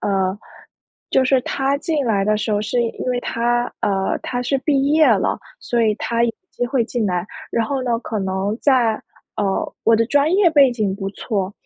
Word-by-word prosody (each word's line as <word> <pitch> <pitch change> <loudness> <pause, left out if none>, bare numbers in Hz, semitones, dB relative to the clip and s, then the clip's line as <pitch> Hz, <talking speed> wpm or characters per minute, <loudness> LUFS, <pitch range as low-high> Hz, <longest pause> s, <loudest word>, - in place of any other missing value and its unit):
呃， 190 -1 0 0.7
就 260 - +3
是 260 0 +3
他 270 +2 0
进 310 -3 -1
来 200 -3 +1
的 215 0 +2
时 215 0 -2
候 205 0 +1
是 240 +3 0
因 230 -1 -3
为 250 -1 0
他， 240 0 0 0.2
呃， 195 -1 0
他 245 -1 -3
是 270 +3 0
毕 275 0 +1
业 315 0 +5
了， - - +2 0.2
所 235 -1 0
以 220 -1 +3
他 235 0 -1
有 235 - +3 0.2
机 245 - -2
会 245 -2 +1
进 235 -1 -2
来。 180 0 -1 0.2
然 230 - 0
后 270 0 -2
呢， 240 -2 0
可 220 -3 -4
能 190 +2 -2
在 250 -5 +3 0.4
呃， 195 -2 -1
我 225 0 +5
的 230 0 +2
专 290 +4 +2
业 385 -1 +5
背 285 -4 +5
景 215 -5 -1
不 195 -1 -4
错， 200 -2 -3
235 Hz, 215 characters per minute, -20 LUFS, 205-265 Hz, 0.7 s, 业